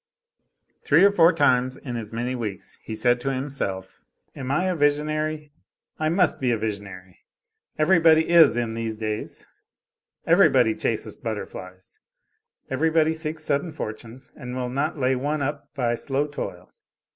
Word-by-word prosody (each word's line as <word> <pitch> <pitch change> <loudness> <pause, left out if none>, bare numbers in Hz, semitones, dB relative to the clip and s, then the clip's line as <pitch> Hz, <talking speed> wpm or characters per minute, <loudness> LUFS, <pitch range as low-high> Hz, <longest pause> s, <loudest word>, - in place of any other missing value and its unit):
Three - - +5
or 200 - +7
four 170 -3 +5
times 130 -5 +2
in 125 -4 -7
as 110 -3 -6
many 120 +3 -3
weeks 110 -6 -6
he 110 - -6
said 120 +2 +2
to 135 - -1
himself, 130 -9 -4 0.3
"Am 130 - -6
I 140 +6 +1
a 185 -1 0
visionary? 150 0 0 0.5
I 155 0 +1
must 175 0 +2
be 130 - 0
a 120 - +2
visionary; 100 -4 -6 0.6
everybody 160 -1 +4
is 165 -8 +6
in 115 -2 -1
these 115 -1 -4
days; 110 -1 -5 0.8
everybody - - +4
chases - - -3
butterflies: 95 0 -7 0.7
everybody 160 +3 +2
seeks 160 -1 -4
sudden 145 +3 -1
fortune 115 -3 -7
and 125 -3 -7
will 125 -1 -3
not 140 +6 -2
lay 130 -1 +1
one 145 +3 -2
up 145 0 -4
by 120 -4 0
slow 135 +4 -1
toil. 90 -11 -7
135 Hz, 145 wpm, -24 LUFS, 115-155 Hz, 0.8 s, or